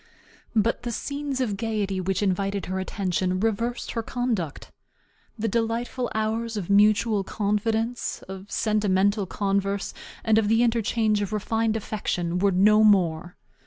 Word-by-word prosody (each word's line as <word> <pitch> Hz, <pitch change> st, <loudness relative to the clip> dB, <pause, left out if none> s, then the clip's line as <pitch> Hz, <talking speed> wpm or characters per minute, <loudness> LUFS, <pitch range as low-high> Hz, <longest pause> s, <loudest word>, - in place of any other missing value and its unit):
But 225 Hz, +1 st, +2 dB
the 240 Hz, -, -4 dB
scenes 280 Hz, +2 st, -3 dB
of 210 Hz, -6 st, -1 dB
gayety 205 Hz, -4 st, -1 dB
which 190 Hz, +2 st, -1 dB
invited 195 Hz, 0 st, 0 dB
her 190 Hz, +1 st, -3 dB
attention 185 Hz, -1 st, -1 dB
reversed 225 Hz, +3 st, -1 dB
her 230 Hz, -, -2 dB
conduct. 225 Hz, -, -3 dB, 0.7 s
The 225 Hz, +1 st, -1 dB
delightful 235 Hz, +3 st, -1 dB
hours 220 Hz, +1 st, -1 dB
of 200 Hz, -1 st, -3 dB
mutual 210 Hz, +1 st, +4 dB
confidence, 220 Hz, +4 st, -1 dB
of 190 Hz, +1 st, -9 dB
sentimental 205 Hz, -1 st, +1 dB
converse, 200 Hz, 0 st, -1 dB, 0.3 s
and 220 Hz, 0 st, +4 dB
of 215 Hz, -, 0 dB
the 225 Hz, +2 st, +4 dB
interchange 225 Hz, -2 st, +1 dB
of 200 Hz, 0 st, -3 dB
refined 220 Hz, +1 st, 0 dB
affection 180 Hz, -5 st, -2 dB
were 200 Hz, +2 st, +3 dB
no 210 Hz, +4 st, +5 dB
more. 175 Hz, -4 st, +2 dB
210 Hz, 135 wpm, -25 LUFS, 195-225 Hz, 0.7 s, no